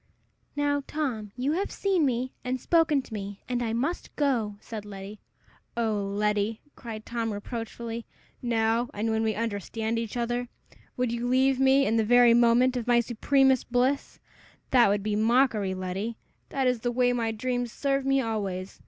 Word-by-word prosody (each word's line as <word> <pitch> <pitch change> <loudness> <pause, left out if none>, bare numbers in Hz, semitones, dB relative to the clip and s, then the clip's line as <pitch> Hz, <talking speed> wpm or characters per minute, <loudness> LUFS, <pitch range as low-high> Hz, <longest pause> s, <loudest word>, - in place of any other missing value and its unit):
"Now, 285 0 +1
Tom, 245 -9 -3
you 260 +4 0
have 380 +6 -1
seen 375 -7 +1
me, 255 +1 -2
and 255 0 -2
spoken 310 -2 +3
to 225 - -12
me, 200 -1 -6
and 245 -1 -1
I 230 -2 -1
must 275 +10 -2
go," 240 -8 0
said 220 -2 -7
Letty. 200 0 -9 0.6
"O 225 -2 +1
Letty!" 210 +2 0 0.2
cried 220 -3 -8
Tom, 230 -1 -2
reproachfully, 230 +2 -5 0.3
"now 230 0 +1
when 220 +1 0
we 220 -1 0
understand 225 +1 -2
each 230 +1 -4
other? 240 +1 -1 0.5
Would 250 -2 0
you 235 +1 -2
leave 260 +1 +3
me 270 +1 +5
in 225 - +1
the 225 - +3
very 245 +1 +6
moment 240 +2 +4
of 245 -1 -3
my 240 -1 +5
supremest 260 +2 +2
bliss? 255 +3 +1 0.5
That 245 -2 +6
would 200 0 +1
be 210 0 -1
mockery, 220 -3 +2
Letty! 190 +5 -4 0.3
That 270 -1 -1
is 250 -2 +2
the 240 +2 -1
way 245 0 +2
my 230 -2 0
dreams 245 +1 -2
serve 275 +1 0
me 270 0 +2
always. 200 -5 -3
235 Hz, 170 wpm, -27 LUFS, 220-255 Hz, 0.6 s, very